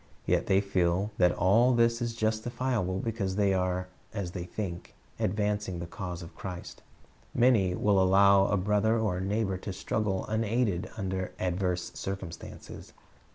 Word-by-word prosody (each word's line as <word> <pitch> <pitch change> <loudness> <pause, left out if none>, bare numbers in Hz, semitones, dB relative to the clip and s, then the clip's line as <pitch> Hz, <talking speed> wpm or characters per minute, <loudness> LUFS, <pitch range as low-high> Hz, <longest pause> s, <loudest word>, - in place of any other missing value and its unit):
Yet - - +1
the}' 95 0 +4
feel 95 +1 +1
that 90 -1 +5
all 115 +9 +4
this 115 0 +3
is 115 -1 -2
justifiable 110 -2 -1
because 100 -3 -2
they 100 -1 +3
are, 90 0 0 0.3
as 95 -5 -3
they 90 -1 -5
think, 90 -1 -6 0.2
advancing 105 -2 -1
the 85 - -5
cause 90 0 -6
of 85 - -11
Christ. 90 -2 -8 0.5
Many 110 -7 +4
will 100 0 +3
allow 95 +1 +5
a 105 - +1
brother 105 +4 +2
or 105 -5 0
a - - -3
neighbor 100 0 0
to 100 - -6
.struggle 95 0 -1
unaided 110 -3 0
under 95 -2 -3
adverse 90 -1 -1
circumstances. 95 -4 -7
100 Hz, 150 wpm, -29 LUFS, 90-110 Hz, 0.5 s, that